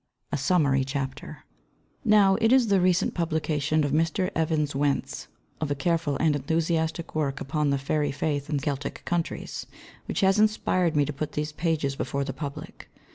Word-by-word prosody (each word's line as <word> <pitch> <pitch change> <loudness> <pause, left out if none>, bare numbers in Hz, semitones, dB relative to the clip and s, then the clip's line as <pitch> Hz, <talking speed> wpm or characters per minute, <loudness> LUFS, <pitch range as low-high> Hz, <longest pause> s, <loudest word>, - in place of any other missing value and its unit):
A - - 0
SUMMARY 140 -3 +2
CHAPTER 135 +2 -5 0.6
Now, 210 -3 +5
it 225 +1 +4
is 255 -4 +5
the 195 -2 +4
recent 180 0 +2
publication 155 -2 0
by 145 - +1
Mr. 165 +6 +1
Evans 155 -3 0
Wentz 140 0 -1 0.3
of 155 - -1
a 145 - 0
careful 160 0 0
and 155 -2 +2
enthusiastic 160 +2 -1
work 145 -3 -1
upon 150 +1 -1
The 140 - +2
Fairy 145 +2 0
Faith 145 +1 -2
in 150 - 0
Celtic 140 0 -4
Countries 170 -1 -3 0.4
which - - -2
has 195 +1 +4
inspired 185 -6 +2
me 145 -1 +3
to 150 - -4
put 150 +2 -4
these 150 0 -2
pages 155 -4 -1
before 140 +1 -2
the 135 -1 -4
public. 140 0 -8
155 Hz, 170 wpm, -26 LUFS, 140-170 Hz, 0.6 s, Now